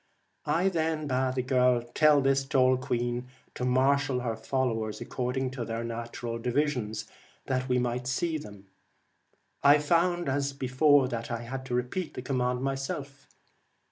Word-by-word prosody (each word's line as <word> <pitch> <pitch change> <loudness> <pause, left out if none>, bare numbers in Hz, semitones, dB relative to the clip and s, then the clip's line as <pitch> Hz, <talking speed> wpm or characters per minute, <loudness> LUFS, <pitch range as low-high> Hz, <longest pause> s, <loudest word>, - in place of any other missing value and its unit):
I 180 +4 +2
then 160 -3 -1
bade 130 -1 0
the 130 - 0
girl 125 -2 +3
tell 150 -2 +5
this 135 0 +2
tall 130 -1 +3
queen 120 -1 -2 0.3
to - - -5
marshal 130 +1 +2
her 115 -2 -2
followers 110 -2 -2
accord 125 0 -3
ing 130 -1 -1
to 130 -2 -4
their 115 0 -3
natural 115 0 -5
divisions, 125 -4 -1 0.4
that 130 0 -1
we 125 - +3
might 125 0 -1
see 155 +4 -1
them. 100 -7 -11 1.0
I 145 +1 +7
found 170 +3 +1
as 140 +1 0
before 135 +1 +3
that 115 -2 -4
I 120 -1 -3
had 130 +2 -6
to 125 - -1
repeat 125 +8 -2
the 125 - -5
command 125 -1 -1
myself. 135 +1 -4
130 Hz, 155 wpm, -28 LUFS, 125-140 Hz, 1.0 s, I